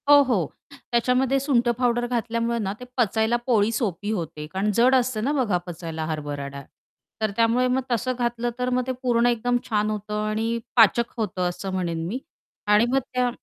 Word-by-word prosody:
हो, 290 0 +9
हो. 215 - +1 0.4
त्याच्यामध्ये 250 +3 +2
सुंठ 260 -3 +1
पावडर 240 0 +1
घातल्यामुळे 235 0 -1
ना, 195 -3 -2
ते 250 - -8
पचायला 220 0 +2
पोळी 220 -3 +3
सोपी 205 -3 -2
होते. 160 -6 -4
कारण 195 +3 0
जड 250 +3 +5
असते 250 -3 +1
ना 265 +6 0
बघा, 240 -10 +1
पचायला 165 -2 -5
हरभरा 145 -3 -4
डाळ. 140 0 -8 0.6
तर 215 -1 +1
त्यामुळे 230 +3 +3
मग 255 +1 +1
तसं 250 +2 0
घातलं 240 0 0
तर 250 0 0
मग 250 0 +1
ते - - 0
पूर्ण 240 -2 +3
एकदम 245 +1 +1
छान 210 -1 +1
होतं 210 0 -3
आणि 225 +2 -1 0.2
पाचक 235 0 +5
होतं 185 -5 -1
असं 180 +2 -5
म्हणेन 170 -3 -2
मी. 235 +8 -3 0.5
आणि 210 +2 +5
मग 270 +2 +3
त्या 250 -1 +2
230 Hz, 185 wpm, -24 LUFS, 195-245 Hz, 0.6 s, हो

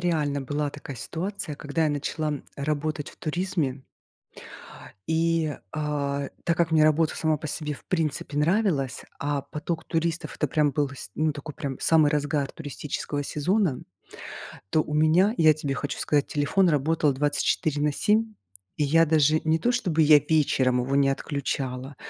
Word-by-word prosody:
реально 150 -5 0
была 145 +2 -2
такая 140 -2 -9
ситуация, 165 - -4
когда 150 +3 -1
я 155 - +2
начала 150 +2 -2
м, 145 -2 -4
работать 150 +1 -2
в - - -19
туризме. 155 -5 -2 1.3
И, 160 -1 +1 0.2
а, 140 -2 -2 0.2
так 170 - +1
как 170 -1 +1
мне 155 -1 +5
работа 155 +1 +2
сама 155 -1 +1
по 155 - -6
себе 150 0 -3
в 140 - -11
принципе 155 -4 -2
нравилась, 155 - +1 0.2
а 145 -1 -1
поток 160 +3 -4
туристов- 165 0 -2
это 150 - 0
прям 150 +1 +2
был 145 +1 0
с 130 -7 -9
ну, 155 0 +1
такой 145 0 -8
прям 140 -4 -5
самый 155 -3 +4
разгар 145 -1 0
туристического 145 -1 -4
сезона, 165 - 0 0.9
то 155 - +3
у 150 - -6
меня, 160 +8 +4
я 155 -1 +6
тебе 145 -2 -3
хочу 145 +1 -4
сказать, 145 -1 +1
телефон 165 +6 +2
работал 150 0 +2
24 145 +1 0
на 150 - +2
7, 215 +8 +1 0.4
и 150 - +1
я 165 +3 +4
даже 155 0 +3
не 160 +1 +2
то 240 - +2
чтобы 180 -10 +1
я 150 -1 +8
вечером 135 -4 +2
его 135 +2 -1
не 140 -1 +4
отключала, 135 -1 -3
150 Hz, 165 wpm, -26 LUFS, 145-160 Hz, 1.3 s, я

